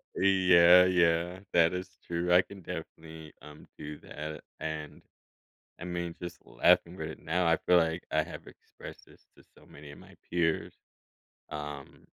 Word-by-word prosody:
Y - - -1
yeah, 90 -1 +6
yeah, 85 0 +1
that 85 0 +4
is 90 0 -6
true, 85 +1 -2
I 90 +1 +6
can 100 -1 -13
definitely, 80 -2 -9
um, 75 +1 -14
do 75 0 -7
that, 75 +1 -7 0.3
a - - -9
and, 80 -1 -6 0.8
I 90 - -7
mean, 85 -1 -4
just 85 - -7
laughing 85 +2 +2
right 80 -1 -6
now, 85 +2 -1
I 80 - +4
feel 90 +1 +3
like 80 0 0
I 80 0 +2
have 85 - -10
expressed - - -13
this - - -21
to - - -19
so - - -19
many 70 0 -13
of - - -13
my - - -16
peers, 80 -2 0 0.8
um, 75 -2 -8
85 Hz, 165 wpm, -29 LUFS, 80-90 Hz, 0.8 s, yeah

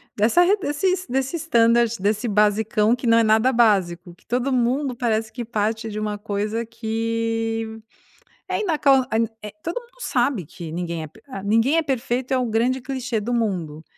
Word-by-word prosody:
dessa 220 +11 +4
re 395 +4 +3
desses 370 +2 -1
desse 265 +5 -1
standard, 235 -6 +3
desse 210 +4 0
basicão 210 +1 +2
que 245 0 -5
não 230 0 +5
é 230 - +5
nada 220 +4 +3
básico, 185 -7 +2
que - - -29
todo 250 +3 0
mundo 255 +2 +1
parece 225 -2 -1
que 240 +1 -6
parte 220 0 -2
de 210 - -6
uma 210 -1 -2
coisa 210 +2 -3
que, 225 0 -2 0.7
é - - -1
inacan 280 -8 +3
en 225 +1 +2
é 210 - -7
Todo 340 +8 -3
mundo 485 +1 -23
sabe 240 - 0
que 160 +2 -9
ninguém 170 -1 -3
é - - -6
p 150 - -20
ah 225 -8 -7
"Ninguém 230 +9 +3
é 330 - +4
perfeito" 260 -2 -2
é 260 - +3
um 245 -2 -1
grande 245 +4 +1
clichê 255 -4 -3
do 240 +4 -2
mundo, 175 -10 -2
230 Hz, 185 wpm, -22 LUFS, 215-255 Hz, 0.7 s, não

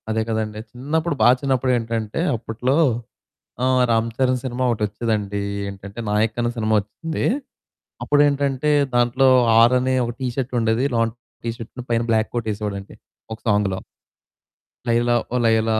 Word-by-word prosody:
అదే 110 0 +1
కదండీ. 110 -1 -2
చిన్నప్పుడు 150 +5 -1
బా 110 - +7
చిన్నప్పుడు 130 -2 +1
ఏంటంటే 115 +3 -3
అప్పట్లో 120 +3 -1 0.9
ఆహ్, 130 0 +3
రామ్ 115 0 +2
చరణ్ 130 -1 +1
సినిమా 130 0 -2
ఒకటి 110 - -3
వచ్చేదండి. 105 -1 -2 0.3
ఏంటంటే 100 +3 -9
'నాయక్' 110 +2 +1
అనే 120 0 +1
సినిమా 110 -1 +1
వచ్చింది. 160 +11 -5 0.8
అప్పుడేంటంటే 145 -1 +2 0.2
దాంట్లో 120 +2 +3 0.3
ఆర్ 120 +2 +6
అని 130 +1 0
ఒక 120 - -3
టీ 130 - -1
షర్ట్ 130 -2 -2
ఉండేది. 115 +3 +1
లోన 115 -1 +2 0.4
టీ 115 - -1
షర్ట్‌ను 120 +2 -9
పైన 115 0 +2
బ్లాక్ 110 -1 +1
కోట్ 115 -2 -2
ఎసేవాడండి. 100 -1 -6 0.4
ఒక - - -12
సాంగ్‌లో. 105 -2 +1 1.1
'లైలా 120 +1 +2 0.2
ఓ - - 0
లైలా' 110 0 +3
115 Hz, 145 wpm, -22 LUFS, 110-130 Hz, 1.1 s, బా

